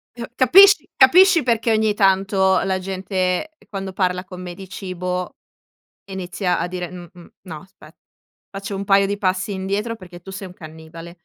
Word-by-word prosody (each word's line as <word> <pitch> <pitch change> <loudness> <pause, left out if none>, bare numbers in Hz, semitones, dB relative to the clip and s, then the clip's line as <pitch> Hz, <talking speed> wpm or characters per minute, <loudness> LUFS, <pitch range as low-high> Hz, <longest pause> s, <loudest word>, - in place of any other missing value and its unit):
Eh, 235 -1 -7
capisci 335 - +6
capisci 350 +6 +6
perché 230 -2 0
ogni 215 -1 +1
tanto 190 -1 +2
la 190 0 -1
gente 185 - -3
quando 195 -2 -6
parla 180 -1 -1
con 185 -2 -11
me 180 -1 -7
di 190 +1 -12
cibo 180 -1 -5 0.7
inizia 185 -1 -2
a - - -2
dire: 180 -1 -6
"Mh-mh, 175 -1 -13
no 160 -5 -9
aspè, 190 +2 -18 0.6
faccio 195 +1 -6
un 195 - -4
paio 195 0 +3
di 200 +1 -3
passi 190 +1 -1
indietro 200 +4 -3
perché 180 -4 -13
tu 190 - -11
sei 190 0 -7
un 180 - -13
cannibale". 165 +1 -12
190 Hz, 165 wpm, -20 LUFS, 180-205 Hz, 0.7 s, capisci